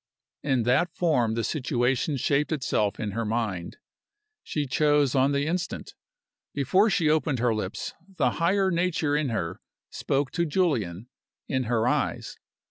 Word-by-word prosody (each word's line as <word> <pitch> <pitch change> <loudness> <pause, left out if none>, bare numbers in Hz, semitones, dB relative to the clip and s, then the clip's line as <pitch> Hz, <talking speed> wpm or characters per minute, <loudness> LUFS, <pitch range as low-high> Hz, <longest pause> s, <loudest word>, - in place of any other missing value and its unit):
In 130 -4 +1
that 130 +9 +2
form 125 -10 +1
the 115 - -1
situation 130 0 0
shaped 145 +4 +1
itself 110 -8 0
in 105 -2 -2
her 115 +3 -2
mind. 110 -6 -2 0.6
She 150 -2 -2
chose 145 0 +2
on 135 +1 +3
the 140 0 0
instant. 180 +4 -3 0.6
Before 185 - +3
she 175 -5 +2
opened 150 -3 +2
her 120 -1 +2
lips 105 -3 -4 0.2
the - - +2
higher 190 +3 +3
nature 170 -4 +1
in 150 -2 0
her 90 -6 -3 0.3
spoke 135 -1 -1
to 170 +2 0
Julian, 120 - 0 0.4
in 130 -1 -1
her 115 0 +1
eyes. - - -1
135 Hz, 145 wpm, -26 LUFS, 115-155 Hz, 0.6 s, on